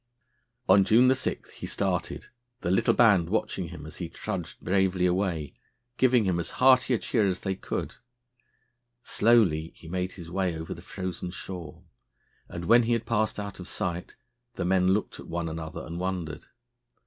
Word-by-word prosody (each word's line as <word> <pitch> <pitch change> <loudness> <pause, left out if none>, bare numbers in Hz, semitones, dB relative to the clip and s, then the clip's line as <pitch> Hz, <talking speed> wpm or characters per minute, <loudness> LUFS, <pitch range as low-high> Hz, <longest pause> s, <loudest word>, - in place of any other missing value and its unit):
On 95 +1 +7
June 125 +6 +5
7 130 -1 -2
he - - -7
started, - - -2 0.3
the 85 - -1
little 95 - +3
band 100 -8 +5
watching 95 -3 -1
him 80 -3 -9
as 80 - -9
he 85 -3 -5
trudged - - -5
bravely 95 -1 +1
away, 90 -5 0 0.4
giving 125 -3 +4
him 90 -2 +1
as 85 - -3
hearty 130 -1 +5
a - - +1
cheer 110 -2 +1
as 95 -1 -1
they 95 - -1
could. 95 - -4 1.1
Slowly 95 -9 +3
he 85 - -14
made 90 +2 -2
his 85 -3 -10
way 90 -3 -1
over 80 0 -5
the - - -11
frozen 90 -1 -5
shore, 90 -4 -8 0.7
and, 85 0 -6
when 120 +6 +6
he 120 0 +1
had 115 -1 -1
passed 110 -2 0
out 100 -1 -6
of 90 - -8
sight, 85 -1 -4 0.4
the - - -2
men 90 0 +3
looked 100 +3 0
at - - -10
one 85 0 -3
another 80 0 -6
and 85 +2 -6
wondered. 90 -4 -4
95 Hz, 170 wpm, -27 LUFS, 85-105 Hz, 1.1 s, On